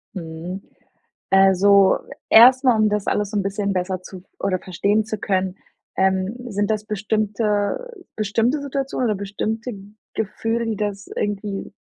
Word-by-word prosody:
Mhm. 170 +2 -6 0.7
Also 195 0 +5 0.3
erstmal, 250 0 +7
um 215 0 +4
das 210 -1 -1
alles 205 -1 0
so 210 - -4
‘n - - +1
bisschen 200 +1 -1
besser 185 0 -2
zu 185 -1 -10
v 185 - -26
oder 190 -2 0
verstehen 200 +5 0
zu 215 0 -4
können, 190 -2 -1 0.4
ähm, 190 +2 +1 0.2
sind 205 +1 -1
das 215 -1 -1
bestimmte 215 - -1 0.3
bestimmte 225 +7 +1
Situationen 275 -3 -2
oder 215 - +1
bestimmte 220 +4 -3 0.4
Gefühle, 225 +2 -2
die 220 - -2
das 205 -1 -3
irgendwie 205 -1 -3
205 Hz, 140 wpm, -22 LUFS, 195-220 Hz, 0.7 s, erstmal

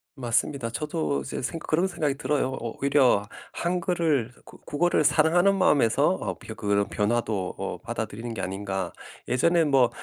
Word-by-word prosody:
맞습니다. 125 0 -1
저도 75 - -2
이제 65 - -5
생각 145 +6 -4
그런 170 +5 +2
생각이 155 -6 -1
들어요. 145 -2 0
오 115 -1 -5
오히려 135 -7 +4 0.3
한글을 170 -8 0
그 - - -14
국어를 165 +1 +1
사랑하는 160 +6 +4
마음에서 145 -11 +3
어 - - -2
벼 - - -8
그런 100 0 0
변화도 105 -3 -1
뭐 - - -4
받아들이는 115 +3 -5
게 - - -4
아닌가. 95 -1 -3 0.4
예전에 170 +7 +3
뭐 135 -5 +4
135 Hz, 345 characters per minute, -26 LUFS, 110-160 Hz, 0.4 s, 오히려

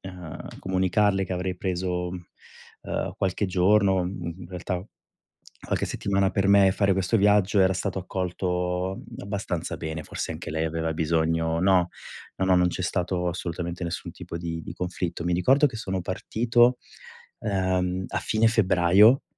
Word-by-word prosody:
ehm, 90 -4 -9
comunicarle 95 +2 +1
che 95 - -5
avrei 90 0 -2
preso, 90 -1 -2 0.7
ehm, - - -3
qualche 95 +2 0
giorno, 95 +1 +3
mhmm, 90 -2 -4
in 85 - -8
realtà 90 0 -4 0.8
qualche - - 0
settimana 100 -1 0
per 95 -1 0
me 100 0 +6
e 95 - +4
fare 100 0 +2
questo 95 +3 +1
viaggio 105 -1 +3
era 95 -1 +5
stato 95 +1 -2
accolto 90 0 -2
a 95 - -6 0.3
abbastanza 100 -4 -3
bene, 80 0 -4
forse - - -5
anche 80 +1 -7
lei 80 +1 -1
aveva 80 0 -2
bisogno 80 0 +1
no, 90 -1 +3 0.5
no, 95 - 0
non 90 0 +4
c'è 90 - -4
stato 90 0 -1
assolutamente 85 0 -4
nessun 85 -1 -4
tipo - - -8
di 85 -1 -4
di - - -7
conflitto. 90 -1 -4
Mi 90 - 0
ricordo 130 - +4
che 125 -5 -4
sono 95 -5 -3
partito, 120 +6 +2 0.6
ehm, 95 -3 0
a - - -2
fine 110 +1 +1
febbraio, 105 +2 +5
90 Hz, 155 wpm, -26 LUFS, 85-95 Hz, 0.8 s, me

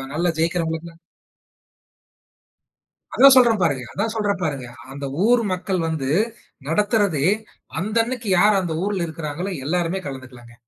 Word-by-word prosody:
நல்லா 170 +2 +1
ஜெயிக்கிறவங்களுக்கு 165 0 -1 2.2
அதா 275 - +8
சொல்றேன் 235 -5 +5
பாருங்க. 135 -7 0
அதா 205 - -1
சொல்றேன் 205 -4 -1
பாருங்க. 135 -6 -3 0.2
அந்த 140 0 -6 0.2
ஊர் 240 +1 +4
மக்கள் 185 0 -2
வந்து 145 -4 -2 0.6
நடத்துறதே 200 - +1 0.5
அந்த 215 +4 -3
அன்னைக்கு 240 -2 -5
யாரு 210 +2 +5
அந்த 170 -3 -3
ஊர்ல 195 -4 -1
இருக்கறாங்களோ 160 +3 -5 0.2
எல்லாருமே 175 +3 -1
கலந்துக்கலாங்க. 130 -3 -9
175 Hz, 120 wpm, -22 LUFS, 150-205 Hz, 2.2 s, அதா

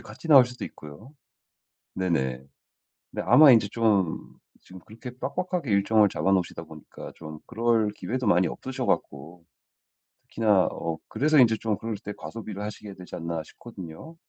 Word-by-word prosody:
같이 165 - -11
나올 135 -5 +8
수도 125 0 -8
있고요. 90 - -13 0.8
네네. 65 -9 -1 0.7
네. - - -3
아마 150 -2 +8
인제 110 -3 +4
좀 100 -6 +1 0.4
지금 95 0 -13
그렇게 115 +3 -9
빡빡하게 180 -4 -3
일정을 105 +1 +4
잡아 95 - 0
놓으시다 90 -3 -1
보니까 80 -1 -11
좀 75 -1 -10
그럴 115 -2 +1
기회도 125 +4 -4
많이 90 -2 +4
없으셔 130 -1 -5
갖고 80 +5 -3 0.8
특히나 105 -5 +2
어 80 -1 -4
그래서 155 +1 +2
인제 115 -3 +5
좀 110 -2 -2
그럴 115 -1 -4
때 105 0 -7
과소비를 105 -3 -8
하시게 105 -1 -7
되지 90 -1 -10
않나 85 -1 -4
싶거든요. 95 - -11
105 Hz, 330 characters per minute, -26 LUFS, 85-120 Hz, 0.8 s, 나올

